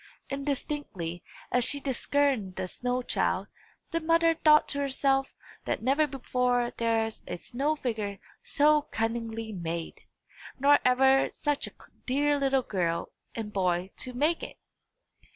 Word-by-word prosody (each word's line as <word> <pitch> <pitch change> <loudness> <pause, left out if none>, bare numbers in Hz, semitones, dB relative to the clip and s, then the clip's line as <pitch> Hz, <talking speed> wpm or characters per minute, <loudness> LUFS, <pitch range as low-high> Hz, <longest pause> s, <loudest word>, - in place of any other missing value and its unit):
Indistinctly 275 - -3 0.3
as 250 - +3
she 285 +4 +1
discerned 265 -6 0
the 185 - -3
snow 250 +5 -2
child, - - 0 0.5
the 330 - 0
mother 330 0 +3
thought 305 -2 +5
to 285 - -2
herself 270 -1 +1 0.3
that - - -2
never 280 +5 +3
before 250 -2 0
was 240 - -4
there 225 -1 +2 0.2
a 175 - -4
snow 270 - -1
figure 220 -8 -3 0.2
so 300 +1 +4
cunningly 225 -3 -3
made, 170 -3 -5 0.6
nor 285 +2 +6
ever 265 +2 +4
such 290 -1 -1
a - - -9 0.4
dear 290 +2 +2
little 270 -1 +2
girl 170 -6 -1 0.2
and 215 -2 -5
boy 185 -1 0
to 255 - -3
make 300 +7 +1
it. - - -8
255 Hz, 135 wpm, -28 LUFS, 220-285 Hz, 0.6 s, nor